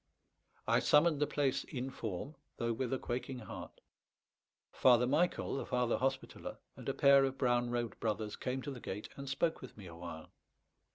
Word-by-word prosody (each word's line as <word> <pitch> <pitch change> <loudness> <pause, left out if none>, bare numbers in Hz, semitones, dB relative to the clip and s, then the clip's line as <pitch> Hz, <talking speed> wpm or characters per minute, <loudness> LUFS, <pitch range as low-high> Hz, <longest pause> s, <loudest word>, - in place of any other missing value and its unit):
I - - +4
summoned 150 0 +4
the 150 - +2
place 140 -3 +1
in 135 -2 -4
form, 110 - -4 0.2
though 115 0 0
with 120 +1 -2
a 135 - +1
quaking 130 +1 -3
heart. 115 - -8 0.9
Father 125 -1 +5
Michael, 150 +2 +1
the - - -3
Father 125 -1 +1
Hospitaller, 135 +1 -2 0.2
and - - -6
a - - +1
pair 140 0 +7
of 135 0 -1
brown 120 -2 +2
robed 120 -2 -2
brothers 110 -1 -1
came 130 0 -3
to 145 - -4
the 130 - -7
gate 105 -2 -5
and 140 -1 -6
spoke 160 +4 0
with 130 - -10
me 100 - -10
a 85 -2 -9
while. 85 -2 -8
125 Hz, 180 wpm, -35 LUFS, 115-135 Hz, 0.9 s, pair